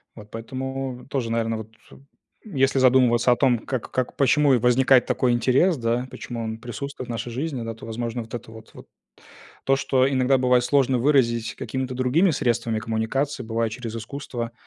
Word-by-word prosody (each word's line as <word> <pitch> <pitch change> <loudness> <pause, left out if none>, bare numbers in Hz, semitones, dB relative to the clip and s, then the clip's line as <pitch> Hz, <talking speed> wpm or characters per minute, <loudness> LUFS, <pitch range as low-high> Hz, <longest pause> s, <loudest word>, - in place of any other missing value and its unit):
Вот 105 -2 -13
поэтому 130 +2 -5
тоже, 125 -5 -2
наверно, 115 -1 0
вот, 110 0 -10 0.2
э, - - -13 0.5
если 135 -8 +1
задумываться 125 -2 +4
о - - +5
том, 125 -3 +2
как 125 +1 -5
как, 130 -1 -2
почему 140 +1 +4
и - - +5
возникает 125 +1 +4
такой 125 -2 +1
интерес, 130 +9 +3
да, 120 +1 -1
почему 120 -2 -6
он 110 0 -4
присутствует 125 +3 -7
в - - -3
нашей 120 +1 -4
жизни, 135 0 -3
да, 115 0 -4
то, 115 - -12
возможно, 115 +1 -4
вот 115 0 -12
это 120 -2 -7
вот 110 -1 -13
вот - - -13 0.8
То, 135 - +3
что 130 -1 +2
иногда 130 0 +2
бывает 125 -1 +3
сложно 135 -2 +2
выразить 120 -3 +2
какими-то 130 -1 -4
другими 130 +9 +2
средствами 120 -6 0
коммуникации, 115 +5 -2
бывает, 115 -1 -2
через 115 -1 -6
искусство 120 -1 -6
125 Hz, 180 wpm, -24 LUFS, 115-135 Hz, 0.8 s, о